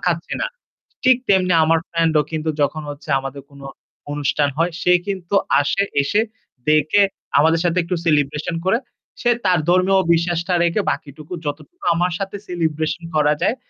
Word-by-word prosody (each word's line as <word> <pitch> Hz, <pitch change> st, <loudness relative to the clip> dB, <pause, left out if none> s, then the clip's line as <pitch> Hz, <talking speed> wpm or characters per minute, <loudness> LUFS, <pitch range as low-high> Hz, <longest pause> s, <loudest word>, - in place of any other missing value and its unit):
খাচ্ছি 170 Hz, -1 st, -1 dB
না। -, -, +1 dB, 0.6 s
ঠিক 255 Hz, -2 st, +6 dB
তেমনি 185 Hz, -2 st, +3 dB
আমার 165 Hz, +1 st, +3 dB
ফ্রেন্ডও 165 Hz, -2 st, +2 dB
কিন্তু 160 Hz, 0 st, -2 dB
যখন 155 Hz, +2 st, 0 dB
হচ্ছে 145 Hz, +1 st, -9 dB
আমাদের 135 Hz, +1 st, -7 dB
কোন 140 Hz, -1 st, -16 dB, 0.5 s
অনুষ্ঠান 145 Hz, 0 st, 0 dB
হয় 170 Hz, +2 st, +1 dB
সে 180 Hz, -, +3 dB, 0.2 s
কিন্তু 195 Hz, -1 st, -3 dB, 0.2 s
আসে, 145 Hz, +7 st, +1 dB, 0.2 s
এসে 205 Hz, +10 st, +1 dB, 0.5 s
দেখে 155 Hz, +6 st, +4 dB, 0.4 s
আমাদের 160 Hz, +3 st, +4 dB
সাথে 175 Hz, 0 st, 0 dB
একটু 175 Hz, +2 st, -2 dB
celebration 150 Hz, +1 st, +1 dB
করে 190 Hz, +5 st, +3 dB, 0.4 s
সে 240 Hz, -, +2 dB, 0.2 s
তার 180 Hz, -2 st, +3 dB
ধর্মীয় 185 Hz, +2 st, +4 dB
বিশ্বাসটা 170 Hz, +2 st, 0 dB
রেখে 170 Hz, +5 st, +1 dB
বাকিটুকু 150 Hz, +3 st, -6 dB
যতটুকু 160 Hz, -, -7 dB
আমার 175 Hz, +2 st, 0 dB
সাথে 195 Hz, 0 st, -4 dB
celebration 160 Hz, -1 st, -2 dB
করা 150 Hz, -1 st, +4 dB
যায়, 235 Hz, -, +2 dB
165 Hz, 155 wpm, -20 LUFS, 150-185 Hz, 0.6 s, ঠিক